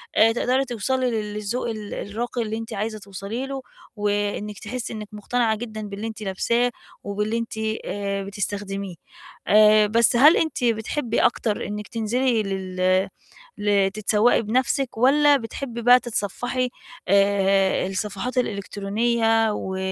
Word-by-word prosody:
آآ، 225 +1 +6
تقدري 255 +3 +1
توصلي 250 +2 -1
للذوق 210 +2 -3
ال 215 -2 -6
الراقي 235 +4 -4
اللي 220 -1 -3
أنتِ 225 0 -6
عايزة 215 +1 -3
توصلي 200 +6 -5
له، 270 -1 -5 0.3
وإنّك 205 0 -2
تحسّي 230 +2 -5
إنّك 215 -1 -6
مقتنعة 220 +2 0
جدًا 220 -1 -6
باللي 205 +1 -5
أنتِ 220 -1 -8
لابساه 235 +5 0 0.3
وباللي 210 +3 -2
أنتِ 230 0 -4 0.3
آآ، 200 -1 -3
بتستخدميه 200 -1 -4 0.5
آآ، 215 0 +6
بس 230 +2 +3
هل 295 +7 +7
أنتِ 320 -5 -1
بتحبي 230 +1 0
أكتر 220 -3 +1
إنّك 210 0 -5
تنزلي 230 +1 0
لل 185 -1 0 0.5
لتتسوقي 205 +2 +2
بنفسِك 255 +3 0
والّا 285 +4 +5
بتحبي 235 0 -6
بقى 245 +2 +7
تتصفحي 245 +3 -2 0.4
آآ، 195 0 +3
الصفحات 205 +6 -3
الإلكترونية، 225 +1 +1
و 190 -2 -4
215 Hz, 125 wpm, -23 LUFS, 200-240 Hz, 0.5 s, هل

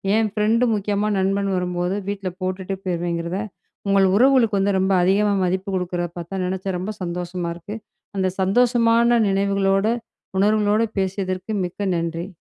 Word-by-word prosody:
என் 220 -1 +2
friend 220 +3 +2
முக்கியமா 205 0 0
நண்பன் 195 +1 +1
வரும்போது, 180 0 -1
வீட்ல 200 -2 -3
போட்டுட்டு 185 +1 -3
போயிருவேங்கறத, 170 0 -2 0.5
உங்கள் 195 -1 +4
உறவுகளுக்கு 235 -3 +4
வந்து 195 0 +2
ரொம்ப 190 +1 +1
அதிகமா 200 +3 +3
மதிப்பு 185 +2 -1
குடுக்கறத 175 -1 -2
பாத்தா, 175 +3 -4
நெனச்சா 190 +1 -2
ரொம்ப 200 +4 -4
சந்தோஷமா 175 0 -3
இருக்கு. 175 +5 -8 0.4
அந்த 190 -1 +1
சந்தோஷமான 235 +3 +3
நினைவுகளோட, 195 0 +1 0.5
உணர்வுகளோட 210 +1 +3 0.2
பேசியதற்கு 190 +1 -2
மிக்க 190 +3 -3
நன்றி. 170 +1 -3
195 Hz, 130 wpm, -22 LUFS, 180-205 Hz, 0.5 s, உங்கள்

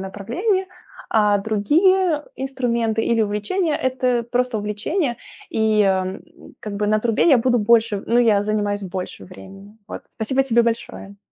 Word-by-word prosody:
направление, 250 - -2 0.4
а 210 -2 +3
другие 300 - +2
инструменты 235 -4 -1
или 230 -1 +2
увлечения- 215 - -1
это 255 -2 0
просто 250 -2 0
увлечение, 215 - -2 0.3
и, 220 -1 +1
э, 190 -1 0 0.4
как 210 -2 -6
бы 210 0 -1
на 215 0 +3
трубе 230 +8 +1
я 270 - +6
буду 245 +1 +2
больше. 220 -2 +2
Ну, 235 +1 +2
я 215 -4 +3
занимаюсь 205 -1 -1
больше 185 - -6
времени. 195 - -13
Вот, - - -8
спасибо 260 +5 -1
тебе 235 -3 +2
большое. 225 -3 -4
225 Hz, 145 wpm, -21 LUFS, 205-255 Hz, 0.4 s, я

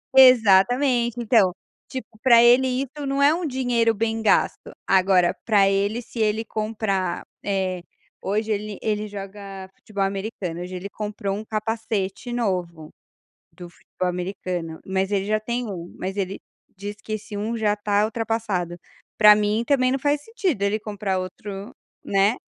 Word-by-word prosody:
Exatamente 245 0 +5
então, 220 -5 +4 0.4
tipo 260 -4 -6 0.2
pra 235 -3 +7
ele 245 +2 +6
isso 275 +3 -3
não 275 +1 0
é 285 +2 +6
um 345 +1 -2
dinheiro 245 -4 +1
bem 225 +1 -1
gasto. 220 - +1 0.2
Agora 185 -2 +4
para 205 -3 +4
ele 200 +4 0
se 235 0 -10
ele 220 0 +1
comprar. 215 -5 -2 0.2
Eh, 190 -3 -1 0.4
hoje 215 +3 -1
ele 210 -1 -3
ele 215 -1 -1
joga 195 -1 -8
futebol 200 -2 -3
americano, 195 -3 -3
hoje 180 +1 -6
ele 185 +2 -6
comprou 205 -1 -4
um 215 - -7
capacete 220 0 -3
novo 180 -9 -2 0.7
do 175 - -10
futebol 180 +1 -5
americano, 180 -2 -4
mas 190 +1 -1
ele 195 -1 0
já 215 +1 +2
tem 235 +2 -3
1 175 -2 -7
mas 190 +2 -4
ele 195 -1 -3 0.4
diz 205 +2 -6
que 215 - -7
esse 215 0 -5
1 220 +3 -2
já 210 -2 +1
tá 205 0 +1
ultrapassado. 220 -6 -2 0.4
Pra 210 -1 +9
mim 210 +2 +1
também 255 -3 +3
não 270 - 0
faz 290 +1 0
sentido 375 - -2
ele 205 +2 +1
comprar 205 -3 -2
outro, 195 +3 -7 0.3
né. 200 +4 +2
210 Hz, 155 wpm, -23 LUFS, 195-230 Hz, 0.7 s, Pra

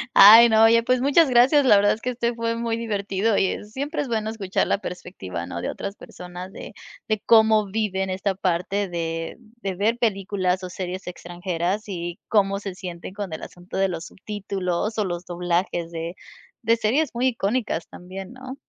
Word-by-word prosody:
Ay, 225 +4 +10
no, 220 0 +5
oye, 230 +1 +5
pues, 255 +1 +2
muchas 285 +3 +4
gracias. 260 +4 +5
La 210 - +7
verdad 205 +1 +4
es 220 - -8
que, 250 - -1
este 235 -1 -1
fue 230 0 -1
muy 230 -1 -1
divertido, 205 -1 0
y 190 - 0
siempre 280 +9 -3
es 285 - -4
bueno 220 -1 -1
escuchar 200 -4 -1
la - - +2
perspectiva, 175 - -6
¿no?, 85 -1 -5
de - - -3
otras 200 +1 -6
personas 180 +1 -9
de - - -9 0.4
de 215 -1 0
cómo 220 -2 +5
viven 190 -3 -1
esta 190 +1 -1
parte 190 +2 -1
de 165 -1 -4 0.2
de 195 -2 -3
ver 220 +5 +1
películas, 195 -4 0
o 185 - -5
series 185 +1 -6
extranjeras. 175 +3 -3
Y 175 -2 -5
cómo 200 -2 +2
se 195 -3 -6
sienten 180 0 -7
con 200 -5 -5
el - - -6
asunto 175 +1 -9
de 195 0 +2
los 170 -2 -5
subtítulos, 200 0 -3
o 215 - +1
los 175 -1 -4
doblajes 175 -1 -1
de 165 +1 -5 0.5
de 230 +1 +3
series 255 +7 +1
muy 250 +2 +2
icónicas 220 -6 -2
también, 190 +4 -9
¿no? 260 +1 -9
200 Hz, 185 wpm, -24 LUFS, 180-225 Hz, 0.5 s, Ay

